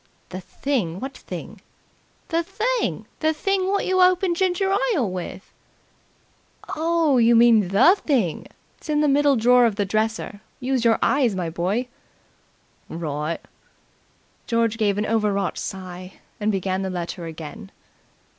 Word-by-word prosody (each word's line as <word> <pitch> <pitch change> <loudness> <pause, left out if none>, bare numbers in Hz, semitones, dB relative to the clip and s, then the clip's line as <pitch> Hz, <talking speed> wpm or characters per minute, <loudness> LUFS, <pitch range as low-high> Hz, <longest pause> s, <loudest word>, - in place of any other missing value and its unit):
"The 185 0 -6
thing? 185 - -2
What 265 +4 -6
thing?" - - -9 0.7
"The 330 0 +1
thing. 470 +8 -2
The 315 0 +1
thing 385 +3 0
wot 400 +1 0
you 370 0 +2
open 365 0 +4
ginger 380 +2 +1 0.2
ile 255 - +1
with." 185 +1 -7 1.2
"Oh, 320 -4 +2
you 235 0 +5
mean 230 -4 +5
the 250 - +5
thing? 255 - -1 0.3
It's - - -14
in 300 0 +2
the 300 - +3
middle 285 0 +4
drawer 245 +1 +5
of 220 - -2
the 205 -1 0
dresser. 215 0 -2 0.2
Use 255 -1 -1
your 230 -1 +4
eyes, 255 -7 +2
my 175 -3 -3
boy!" 195 +9 -1 1.0
"Wri'". 155 0 -3 1.1
George 230 -1 0
gave 205 -2 +1
an 210 - 0
overwrought 210 -4 0
sigh 185 -1 -7 0.3
and 210 0 +1
began 190 -1 -1
the 190 - -2
letter 175 -1 -5
again. 160 +4 -9
230 Hz, 140 wpm, -23 LUFS, 190-300 Hz, 1.2 s, you